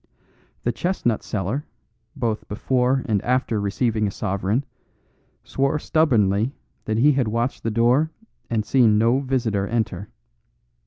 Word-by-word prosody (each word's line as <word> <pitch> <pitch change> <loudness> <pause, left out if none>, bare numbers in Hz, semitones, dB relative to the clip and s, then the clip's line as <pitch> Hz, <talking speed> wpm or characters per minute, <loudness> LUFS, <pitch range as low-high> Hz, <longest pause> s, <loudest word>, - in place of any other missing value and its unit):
The 120 - +1
chestnut 120 - -1
seller, 105 +8 -3 0.5
both 115 -6 -2
before 125 +4 +1
and 105 -4 +1
after 125 -4 0
receiving 110 +1 0
a - - -1
sovereign, 100 +7 -1 0.8
swore 135 +2 0
stubbornly 120 - +2 0.3
that 110 0 -1
he 140 +6 +5
had 130 -4 +1
watched 115 +4 -1
the 115 - -1
door 120 +7 +3 0.4
and 110 -2 0
seen 115 -2 +4
no 115 +4 +3
visitor 120 -7 -1
enter. 105 -4 -2
115 Hz, 125 wpm, -23 LUFS, 105-130 Hz, 0.8 s, he